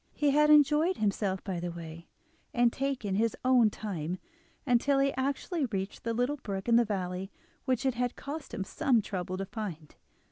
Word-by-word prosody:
He 295 -2 +2
had 300 +1 +4
enjoyed 300 +4 +5
himself 200 -2 0
by 190 -3 -3
the 175 +1 -3
way, 170 -1 -9 0.5
and 240 -1 +4
taken 265 -7 -2
his 220 +3 +1
own 250 -4 +5
time, 180 -5 -4 0.5
until 270 +2 +3
he 275 0 +2
actually 280 +4 -1
reached 195 -3 -4
the 230 - 0
little 250 +5 0
brook 195 -6 -5
in 235 - +5
the 235 - +6
valley 190 -2 -3 0.3
which 255 0 0
it 265 - +2
had 245 +1 -1
cost 295 +2 -7
him 195 - -3
some 230 +3 +1
trouble 185 -2 -4
to 195 - -3
find. 190 -7 -6
230 Hz, 180 wpm, -30 LUFS, 190-270 Hz, 0.5 s, the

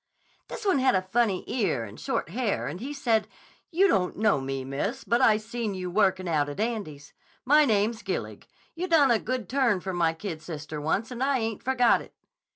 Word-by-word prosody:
"This - - -7
one 380 -8 +3
had 260 -1 +3
a 185 - +1
funny 195 0 +1
ear 195 - -1
and 105 0 -10
short - - -2
hair 220 +2 -1
and 155 +6 -5
he 265 +6 -5
said, 230 -7 +1 0.4
'You 380 +3 +4
don't 185 - +1
know 210 -9 +2
me, 135 0 -4
miss. 200 - -3
But 235 - +1
I 215 - +5
seen 220 -1 -4
you 180 -1 -4
workin' 190 -2 +2
out 150 -3 +1
at 145 - -7
Andy's. 205 -11 -4 0.3
My 300 +3 +6
name's 220 0 +1
Gillig. - - -5 0.3
You 350 +2 -3
done 305 -7 +5
a 230 - +3
good 250 -3 -3
turn 250 -7 +2
for 190 +1 -5
my 170 -2 +1
kid 165 -2 -6
sister 150 -2 -6
once 200 - -1
and 250 0 -6
I 275 0 +2
ain't 225 -3 -3
forgot 250 -2 +3
it. - - -15
215 Hz, 205 wpm, -27 LUFS, 175-250 Hz, 0.4 s, My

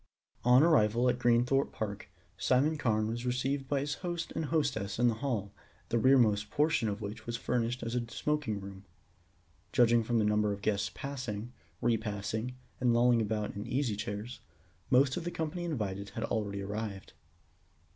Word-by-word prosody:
On 125 +3 +6
arrival 125 -6 +4
at - - 0
Greenthorpe 120 +3 +3
Park, 105 -2 -5 0.3
Simon 130 +10 +2
Carne 110 -7 +1
was 115 +2 -3
received 130 +2 -1
by 140 -1 0
his 145 +1 -2
host 175 -2 -3
and 160 - -2
hostess 135 -11 -1
in 120 +1 +4
the - - +1
hall, 110 -8 -2 0.4
the 115 - +2
rear 130 +4 +6
most 105 -4 +2
portion 150 -5 +2
of 100 +1 -4
which 110 +2 -7
was 120 0 -2
furnished 120 +1 -1
as 115 - -3
a 120 -2 -2
smoking 150 -7 -1
room. 100 0 -9 0.9
Judging 120 -1 +4
from 120 +1 0
the 110 - +3
number 105 0 +2
of 100 0 -5
guests 105 -2 +1
passing, 125 -5 -5 0.3
repassing, 110 +1 -1 0.2
and 120 -2 +3
lolling 120 0 +4
about 105 -1 -2
in 100 - -4
the 120 +4 -2
easy 130 -7 0
chairs, 105 +4 -5 0.5
most 130 +1 +4
of 175 - -3
the 175 - -2
company 165 +1 -3
invited 100 - -3
had 110 +3 -5
already 100 -3 -2
arrived. 105 -1 -5
120 Hz, 175 wpm, -31 LUFS, 105-130 Hz, 0.9 s, On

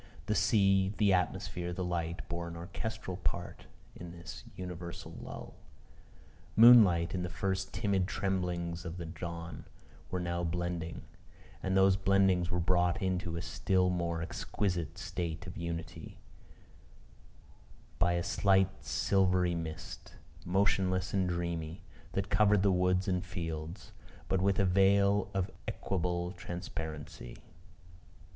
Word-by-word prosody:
The 105 - 0
sea, 100 -1 +3
the 100 -3 +4
atmosphere, 90 -1 -1
the 90 - -3
light, 85 -1 -3
bore 85 0 -4
an 85 - -7
orchestral 95 +2 -5
part 85 -2 -4 0.3
in 85 - -8
this 85 0 -9
universal 85 -1 -7
lull. - - -8 1.0
Moonlight, 105 -8 +8
in 90 - -1
the 90 - -3
first 95 +2 -2
timid 100 -4 +1
tremblings 90 -4 -2
of 85 0 -6
the 85 - -5
dawn, 85 0 -6 0.4
were 90 - -2
now 85 0 -2
blending: 85 -1 -3 0.6
and 95 0 +1
the 95 0 +6
blendings 95 -2 +3
were 90 -1 0
brought 90 0 +2
into 90 -3 -1
a 85 - -4
still 90 +2 +1
more 85 -2 -1
exquisite 90 -1 -2
state 80 -3 -4
of - - -8
unity, 85 -1 -6 1.8
by 85 0 +3
a 85 0 0
slight 95 0 +2
silvery 90 -2 +2
mist, 80 0 -6 0.3
motionless 95 0 +1
and 95 -2 +2
dreamy, 85 -1 -3 0.3
that 100 +1 -2
covered 105 -2 +4
the 100 - +4
woods 90 0 +2
and 90 -1 +1
fields, 85 -1 -5 0.4
but 95 - +1
with 95 0 +2
a 100 - +3
veil 100 +2 +4
of 95 -1 0 0.2
equable 90 -1 -1
transparency. 80 -7 -6
90 Hz, 125 wpm, -32 LUFS, 85-95 Hz, 1.8 s, Moonlight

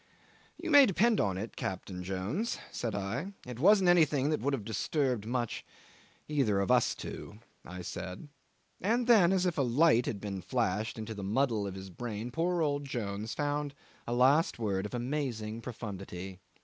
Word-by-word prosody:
'"You 335 - -4
may 285 -2 +9
depend 220 +3 +3
on 95 -2 0
it, 110 +4 -5
Captain 95 -1 -4
Jones," 95 - -2
said 115 - -3
I, 115 - -3
"it 125 -1 -7
wasn't 190 +4 +5
anything 155 -5 +4
that 155 - +1
would 140 - 0
have 110 -6 -7
disturbed 125 0 -1
much 120 -1 -2 0.6
either 130 -10 +1
of 100 +5 +1
us 125 -2 +3
two," 105 - -8 0.3
I 90 0 -8
said; 90 - -6 0.5
and 235 +6 +1
then, 210 -7 +6
as 190 -1 +2
if 175 -4 0
a - - +4
light 125 0 +4
had 105 - -2
been 100 -2 -5
flashed 110 +1 -1
into 110 0 -5
the 105 - -7
muddle 110 0 +1
of 95 - -6
his 95 0 -8
brain, 115 +3 -5
poor 170 +4 +1
old 145 -1 0
Jones 110 -4 -4
found 145 -1 -1 0.3
a 120 - -1
last 135 +7 +4
word 100 -3 -1
of 115 - -7
amazing 120 -4 -3
profundity. 95 -6 -7
120 Hz, 175 wpm, -31 LUFS, 100-150 Hz, 0.6 s, may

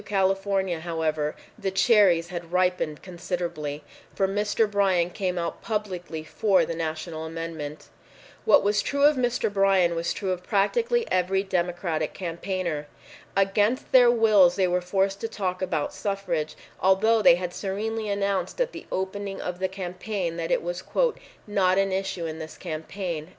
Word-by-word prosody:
California, 195 -2 +1
however, 160 -2 -1 0.2
the 195 - -1
cherries 190 -4 +4
had 170 -2 -6
ripened 180 -4 0
considerably, 170 -5 -4 0.3
for 195 - +2
Mr. 210 +3 +1
Bryan 190 -4 +2
came 185 -2 -2
out 170 -1 -3
publicly 185 -7 -4
for 200 +4 +2
the - - -3
national 160 0 -4
amendment. 160 -2 -6 0.6
What - - +5
was 205 0 +2
true 280 +5 -1
of 295 +1 +6
Mr. 245 -4 0
Bryan 195 -3 +3
was 170 0 -1
true 190 -2 -2
of 180 -1 -2
practically 460 - +1
every 185 +1 +2
Democratic 175 -4 -1
campaigner. 170 -3 -3 0.5
Against 205 +5 +2
their 250 -2 +7
wills 215 -7 +5
they 190 -2 +2
were 180 0 +1
forced 195 +2 0
to 225 - -1
talk 185 -4 -3
about 165 -5 -1
suffrage, 190 -6 -2 0.2
although 215 +4 +4
they 170 - +7
had 180 0 -4
serenely 215 +3 -3
announced 200 - -1
at - - +1
the - - -10
opening 195 +1 -3
of 180 0 -4
the 190 - +1
campaign 185 -1 -4
that 165 -1 -3
it - - +1
was 175 +1 -3 0.6
"not 195 -3 +2
an 195 0 +2
issue 190 -2 -2
in 160 0 -5
this 160 -1 -8
campaign." 165 0 -5
185 Hz, 155 wpm, -26 LUFS, 170-200 Hz, 0.6 s, their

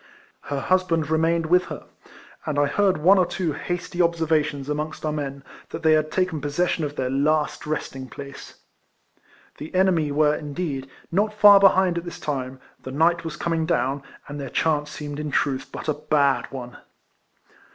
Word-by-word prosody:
Her 140 -1 -3
husband 170 -4 +1
remained 165 +1 +2
with 180 +3 +3
her: - - -8 0.6
and 150 -2 -1
I 145 - +4
heard 190 +5 +2
one 185 +6 +5
or 180 - +4
two 175 -4 -2
hasty 175 +3 -3
observations 160 -4 +1
amongst 150 +1 -4
our 155 - 0
men. 140 -2 -4 0.3
that 165 - -7
they 160 - +5
had 155 0 +3
taken 180 -5 0
pz^session 155 +4 0
of 145 -1 -4
their 130 -2 -2
last 150 +3 0
resting 135 -4 -4
place. 140 -1 -10 1.0
The 155 +4 -8
enemy 180 -5 +2
were, 150 +1 +3
indeed, 145 -3 -4 0.2
not 210 +4 +1
far 205 -1 +8
behind 190 -3 +4
at 170 - -11
this 175 - -7
time, 130 -3 -4 0.2
the - - -8
night 165 +5 +2
was 165 -2 -6
coming 165 -1 -1
down, 140 -4 0 0.3
and 145 0 -7
their 135 -2 -5
chance 150 +1 0
seemed 145 -1 -6
in 150 0 -3
truth 135 -2 -1
but - - -7
a 155 - +2
bad 140 -4 +1
one. 125 -2 -8
155 Hz, 170 wpm, -24 LUFS, 145-170 Hz, 1.0 s, far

